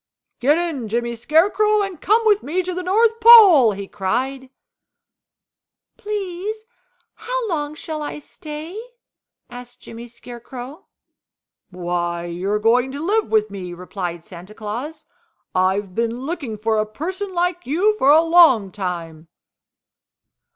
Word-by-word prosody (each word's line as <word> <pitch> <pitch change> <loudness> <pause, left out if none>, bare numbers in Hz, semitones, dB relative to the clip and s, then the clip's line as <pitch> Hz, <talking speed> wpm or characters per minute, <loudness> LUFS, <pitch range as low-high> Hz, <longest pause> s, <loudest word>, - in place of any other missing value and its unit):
"Get 285 +6 +3
in, 320 -9 -3
Jimmy 235 +2 -2
Scarecrow, 405 - +2
and 385 -5 -6
come 445 +3 +2
with 420 -2 +4
me 360 +5 -2
to 365 +1 -4
the 365 - -4
North 445 +5 +2
Pole!" 400 - +8
he 200 0 -7
cried. 255 +8 -3 1.5
"Please, 415 +1 -5 0.5
how - - -4
long 300 -5 -3
shall 310 0 -6
I 295 - -5
stay?" 310 +6 -9 0.7
asked 245 0 -12
Jimmy 235 +1 -10
Scarecrow. 245 +5 -11 0.8
"Why, 175 -1 -3
you 175 +3 -4
are 210 - +1
going 240 +4 +2
to 280 - -6
live 410 +7 0
with 215 -1 +1
me," 180 -3 -7
replied 175 -2 -6
Santa 180 +4 -12
Claus. 255 +9 -6 0.5
"I've 190 +1 0
been 230 +3 -2
looking 275 -7 -5
for 220 +1 0
a 215 - -1
person 370 - -5
like 355 -1 -1
you 380 +10 +2
for 270 - +3
a 310 +3 +6
long 325 - +5
time." 170 -5 -6
270 Hz, 135 wpm, -20 LUFS, -, 1.5 s, Pole